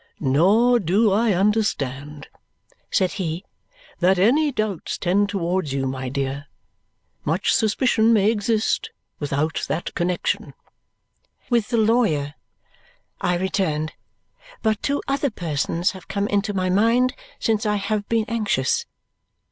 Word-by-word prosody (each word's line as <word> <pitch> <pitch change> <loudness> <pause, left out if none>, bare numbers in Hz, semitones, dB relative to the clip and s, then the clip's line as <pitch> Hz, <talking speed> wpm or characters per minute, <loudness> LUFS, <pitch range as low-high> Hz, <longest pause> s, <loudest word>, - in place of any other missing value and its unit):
"Nor 200 - +4
do 200 +3 +2
I 215 +2 +3
understand," 150 - -1 0.6
said 185 -1 +1
he, 175 -1 -4 0.5
"that 185 +1 +3
any 280 +11 +3
doubts 215 - -2
tend 200 +3 +1
towards 180 -6 -1
you, 135 -1 -1
my 130 -1 -3
dear. 135 +2 -3 0.8
Much - - +1
suspicion 225 0 +2
may 215 -1 +4
exist 225 - 0 0.3
without 145 +2 -1
that - - -3
connexion." 175 0 -1 1.0
"With 235 -3 +2
the 235 - +1
lawyer," 215 -11 +2 0.9
I 180 0 +1
returned. 165 -4 -1 0.7
"But 215 -1 +1
two 285 0 -1
other 280 +1 0
persons 170 - -1
have 190 -2 -12
come 200 +1 -1
into 205 +1 0
my 185 -2 0
mind 230 +6 +3 0.2
since 220 0 0
I 210 - +2
have 205 +1 -2
been 225 -1 +1
anxious. 210 - 0
195 Hz, 125 wpm, -22 LUFS, 160-220 Hz, 1.0 s, Nor